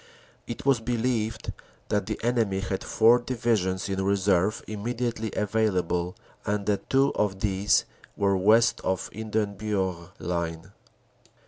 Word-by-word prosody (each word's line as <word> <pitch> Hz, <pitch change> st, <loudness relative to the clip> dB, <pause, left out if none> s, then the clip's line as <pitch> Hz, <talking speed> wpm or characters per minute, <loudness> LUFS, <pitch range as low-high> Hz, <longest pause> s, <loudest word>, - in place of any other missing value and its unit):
It 120 Hz, -, -6 dB
was 135 Hz, -4 st, +4 dB
believed 115 Hz, -1 st, -1 dB, 0.4 s
that 105 Hz, -2 st, 0 dB
the 110 Hz, -, -3 dB
enemy 115 Hz, -5 st, +1 dB
had 95 Hz, -1 st, -3 dB
four 115 Hz, +2 st, +5 dB
Divisions 115 Hz, -7 st, 0 dB
in 95 Hz, -1 st, -1 dB
reserve 100 Hz, 0 st, +2 dB
immediately 115 Hz, +1 st, -3 dB
available, 95 Hz, -5 st, 0 dB, 0.3 s
and 105 Hz, -1 st, -1 dB
that 105 Hz, -1 st, -1 dB
two 135 Hz, +1 st, +3 dB
of 95 Hz, -2 st, -1 dB
these 100 Hz, 0 st, +2 dB, 0.3 s
were 100 Hz, -1 st, +2 dB
west 110 Hz, +5 st, +4 dB
of 95 Hz, -1 st, -1 dB
the -, -, -10 dB
Hindenburg 100 Hz, -5 st, -2 dB
Line. 85 Hz, +1 st, -3 dB
105 Hz, 125 wpm, -27 LUFS, 95-115 Hz, 0.4 s, four